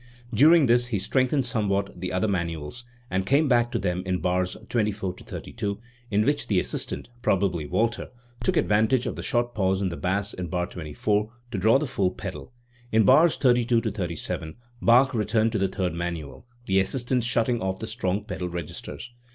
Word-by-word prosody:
During 155 +7 +6
this 120 0 +3
he 115 -4 -1
strengthened 130 +7 +1
somewhat 100 -5 -1
the 90 - -3
other 90 +3 +1
manuals, 85 +3 -3 0.3
and 95 +1 +1
came 140 +9 +3
back 120 -2 +3
to - - 0
them 90 -1 -1
in 95 -1 -1
bars 90 +1 -1
24 105 -5 -1
32, 100 +2 -5 0.3
in 105 0 +2
which 145 +1 0
the 100 -4 +2
assistant 115 - -4
probably 90 - +1
Walther, 115 +8 0 0.3
took 185 -2 +1
advantage 110 +4 +2
of - - -3
the - - -6
short 120 0 0
pause 95 -2 +1
in 95 -2 0
the 85 - -5
bass 100 +2 -1
in 90 -1 -5
bar 90 +1 -1
24 105 +5 -2 0.2
to 110 - -2
draw 110 +6 +5
the 150 - -1
full 100 -9 0
pedal. 75 -6 -7 0.4
In 110 0 +4
bars 150 - +5
32 120 -2 +3
37 90 -7 -4 0.3
Bach 130 +3 +5
returned 110 0 +1
to 110 - -1
the 95 - +2
third 95 -2 -2
manual, 85 - -5 0.2
the 95 -2 +3
assistant 125 +5 0
shutting 120 0 +1
off 95 0 -1
the 110 - -5
strong 105 -2 -2
pedal 90 -5 -4
registers. 85 +7 -7
105 Hz, 180 wpm, -25 LUFS, 90-120 Hz, 0.4 s, During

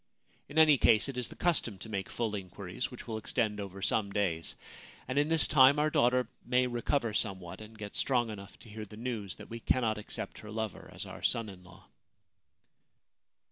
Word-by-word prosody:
In 145 - -7
any 155 -4 +7
case, 110 +2 +5
it 135 - -5
is 125 -2 -1
the - - -11
custom 150 - +1
to 95 - -9
make 100 -3 -3
full 115 -3 -2
inquiries, 95 +3 -5
which 125 - -10
will 110 -2 -3
extend 105 -1 -1
over 100 -1 -6
some 105 -2 +1
days; 90 -5 -1 0.5
and 130 +3 +1
in 145 +2 +2
this 165 -2 +6
time 140 0 +7
our 155 +1 +2
daughter 125 0 +3 0.2
may 125 +1 +2
recover 120 -1 0
somewhat 95 -3 -1
and 110 +1 -11
get 105 -1 -7
strong 120 -4 +1
enough 100 -2 -10
to 115 - -14
hear 110 +1 -7
the 105 - -12
news 110 -5 -4
that 105 - -12
we 115 - -5
cannot 110 -2 +1
accept 105 - -5
her 105 - -10
lover 110 -2 -4
as - - -6
our - - -9
son 115 -2 +1
in 90 -2 -12
law.' 90 +1 -16
110 Hz, 200 wpm, -31 LUFS, 100-125 Hz, 0.5 s, any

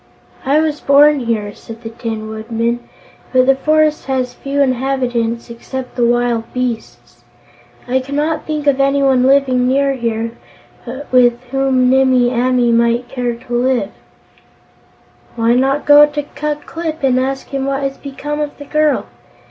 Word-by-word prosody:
"I 285 +3 +4
was 305 -1 -2
born 290 +1 +5
here," 220 -4 -2
said 225 +3 -12
the 225 - -6
Tin 225 -2 -5
Woodman, 230 +2 -2 0.5
"but 255 -1 +4
the 270 - +5
forest 310 +2 +1
has 255 -2 -1
few 280 +1 -4
inhabitants 250 -3 -1
except 250 +2 -7
the 245 - 0
wild 240 -1 0
beasts. 250 -3 -5 0.6
I 255 +1 +1
cannot 295 +4 -2
think 305 -1 -3
of 275 -1 +3
anyone 275 -2 +3
living 260 -1 +3
near 275 +1 +2
here 230 -2 -2 0.8
with 245 -2 +4
whom 265 -2 +2
Nimmie 260 -2 +3
Amee 250 -1 +2
might 235 +1 +1
care 245 -2 -2
to 245 +1 -10
live." 245 -4 0 1.4
"Why 230 0 +2
not 270 +3 +1
go 295 0 +8
to 295 0 -4
Ku 295 +1 -4
Klip 320 -2 -5
and 255 -1 +3
ask 270 +1 -3
him 275 -1 -3
what 275 0 -1
has 275 0 -3
become 290 +2 -5
of 295 -1 -4
the 285 - -10
girl?" 305 0 +1
260 Hz, 150 wpm, -16 LUFS, 240-280 Hz, 1.4 s, go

